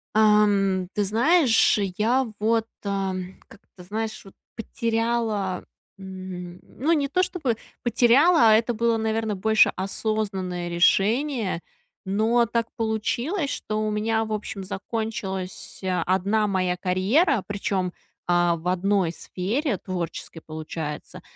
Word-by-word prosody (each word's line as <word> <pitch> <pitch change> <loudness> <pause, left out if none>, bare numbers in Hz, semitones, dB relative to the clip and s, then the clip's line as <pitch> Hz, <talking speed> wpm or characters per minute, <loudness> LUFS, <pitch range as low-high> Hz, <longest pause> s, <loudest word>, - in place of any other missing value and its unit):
Ам, 205 -3 +3
ты 210 - +1
знаешь, 240 - +4 0.2
я 245 +4 +2
вот, 225 +1 +2 0.2
а, 195 -1 -1 0.3
как-то, 200 -4 -16
знаешь, 215 +4 -4
вот 195 - -14 0.2
потеряла, 225 -4 -1 0.3
м, 185 -2 -8
ну, 295 +6 -2
не 295 -4 +2
то 365 +6 +1
чтобы 295 -11 -1 0.3
потеряла, 245 +3 +5
а 215 - +7
это 230 +2 +3
было, 230 0 +1
наверно, 220 -1 -1
больше 220 +3 +4
осознанное 190 -3 -2
решение. 205 - +2 0.4
Но 220 +5 +2
так 230 0 -1
получилось, 240 - -1
что 215 - -4
у 215 0 0
меня, 220 +1 0
в 220 - -4
общем, 205 -2 -5
закончилась, 195 -2 -5 0.3
одна 200 +4 +1
моя 185 -2 0
карьера, 195 - +2
причем, 195 -3 -2 0.3
а, 175 -1 +3
в 165 +2 -7
одной 185 -1 +1
сфере, 210 - -2
творческой, 175 -2 -5
получается. 155 -1 -6
210 Hz, 120 wpm, -24 LUFS, 185-230 Hz, 0.4 s, а